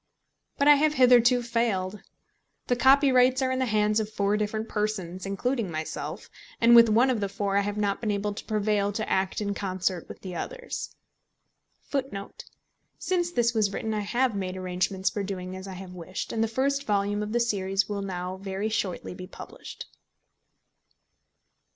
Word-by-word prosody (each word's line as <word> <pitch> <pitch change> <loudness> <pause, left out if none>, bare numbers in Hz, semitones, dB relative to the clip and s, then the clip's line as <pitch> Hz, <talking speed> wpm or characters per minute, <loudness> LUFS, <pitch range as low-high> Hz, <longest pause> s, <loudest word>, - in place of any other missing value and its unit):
But 280 - +2
I 295 -1 +8
have 305 +1 +2
hitherto 245 -1 +5
failed. 210 -5 -1 0.6
The 245 - +1
copyrights 260 0 +5
are 260 - +1
in 260 - -1
the 260 - +1
hands 210 0 +2
of 215 -1 -2
four 200 -1 +1
different 215 +1 -2
persons, 195 -4 -3
including 225 +2 -1
myself, 155 -1 -5 0.3
and 235 +1 +6
with 230 -1 +8
one 240 +5 +4
of 240 - 0
the 200 -1 -1
four 200 0 -2
I 200 - +4
have 205 +1 -3
not 200 -1 0
been 220 - -1
able 205 0 -1
to - - -8
prevail 210 -2 +1
to 215 +1 -3
act 190 +2 0
in 205 -1 -1
concert 185 -3 -2
with - - -10
the 185 -2 -7
others. - - -5 0.9
[Footnote 260 -8 -4
10: - - -10 0.5
Since 350 -2 -1
this 235 -4 +2
was 215 -3 +2
written 220 +2 -3
I 215 - -1
have 240 +3 0
made 190 -1 -3
arrangements 185 +1 -1
for 205 - -3
doing 185 -2 -5
as 190 +1 -8
I 190 - -6
have 185 0 -9
wished, 180 +1 -6
and 225 - +1
the - - +1
first 275 +5 -1
volume 205 0 +1
of 210 0 -4
the 240 - +1
series 195 -4 0
will 205 -1 -3
now 185 -1 -4
very 195 +2 -3
shortly 195 -6 -2
be 185 0 -9
published. - - -10
210 Hz, 180 wpm, -27 LUFS, 195-235 Hz, 0.9 s, I